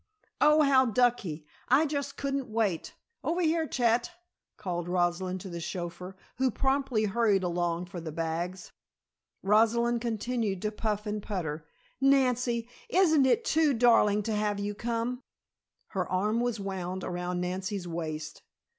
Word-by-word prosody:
"Oh, 300 +1 +6
how 265 -2 +5
ducky! 220 -10 +1 0.2
I 275 +6 +5
just 280 -1 -3
couldn't 275 -2 -2
wait. 215 -6 -1 0.3
Over 345 +2 0
here. 320 0 +1
Chet!" 235 -2 +1 0.5
called 175 -4 -4
Rosalind 180 +1 0
to 195 - -7
the 170 -1 -5
chauffeur, 180 +2 -5 0.2
who 260 0 +3
promptly 265 -2 0
hurried 205 -2 +2
along 175 0 -1
for 180 -1 -8
the 160 -1 -6
bags. 165 +3 -3 0.7
Rosalind 230 +3 +3
continued 225 -3 -1
to 210 - 0
puff 210 -1 -2
and 210 0 -3
putter. 160 -7 -4 0.3
"Nancy! 250 -4 +2 0.2
Isn't 320 -9 +4
it 450 - +2
too 310 -4 +3
darling 225 -3 +4
to 220 - -2
have 210 -1 0
you 205 +1 -2
come?" 235 +3 -2 0.7
Her 185 -3 -3
arm 210 +5 +1
was 240 -2 -1
wound 190 -2 -4
around 180 0 -3
Nancy's 185 +1 -3
waist. 155 -2 -5
210 Hz, 140 wpm, -29 LUFS, 180-245 Hz, 0.7 s, Oh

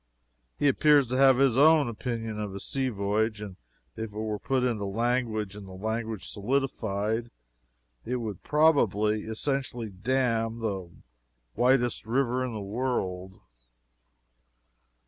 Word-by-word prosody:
He 145 - +2
appears 145 -1 +4
to 130 - 0
have 135 -1 +6
his 135 -3 +3
own 155 -1 +6
opinion 115 -2 -4
of 105 -2 -4
a - - -5
sea 135 +5 -1
voyage, 105 +1 -1
and 105 -3 -7 0.4
if 110 - -4
it 105 - -11
were 110 -1 -2
put 130 +4 0
into 115 -5 0
language 110 -1 -1
and 105 -2 -9
the 95 - -10
language 110 0 -3
solidified, 110 -2 -1 0.7
it 125 - -2
would 110 -6 -4
probably 110 -9 +2
essentially 120 -1 -3
dam 115 +2 0
the 100 -6 -3 0.7
widest 120 -3 +2
river 125 +1 +1
in 130 - -3
the 110 -2 -5
world. 95 -5 -3
115 Hz, 130 wpm, -28 LUFS, 105-130 Hz, 0.7 s, have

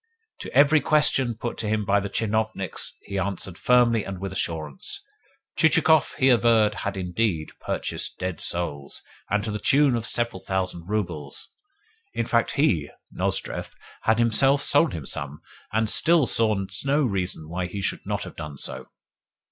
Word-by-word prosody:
To - - -7
every 145 +3 +5
question 135 -5 +3
put 120 +1 -5
to 110 - -2
him 105 -1 0
by 100 0 +3
the 100 0 -4
tchinovniks 110 -3 -2
he 100 - -4
answered 95 -1 -3
firmly 120 0 +3
and 95 -2 -6
with 95 0 -5
assurance. 80 -6 -4 0.5
Chichikov, 160 -1 +4
he 135 - +3
averred, 115 -3 +4
had 100 -1 -3
indeed 90 -3 -1
purchased - - -3
dead 90 -3 -4
souls, 75 -5 -3 0.3
and 105 0 +1
to 110 - -3
the 105 - -3
tune 140 +2 +4
of 115 0 -2
several 120 -5 -1
thousand 90 -3 -3
roubles. 85 -9 -3 0.7
In - - 0
fact, 115 -1 +1
he 140 - +1 0.2
(Nozdrev) - - -2 0.3
had 110 0 +2
himself 135 +5 +3
sold 145 +3 +5
him 80 -5 -6
some, 70 +3 -4 0.3
and 110 +1 +1
still 165 +6 +4
saw 110 -5 +2 0.2
no 145 +2 +2
reason 95 - -2
why 90 +2 -3
he 100 +3 -6
should - - -2
not - - -3
have - - -9
done 75 -2 -7
so. - - -5
105 Hz, 160 wpm, -25 LUFS, 90-120 Hz, 0.7 s, every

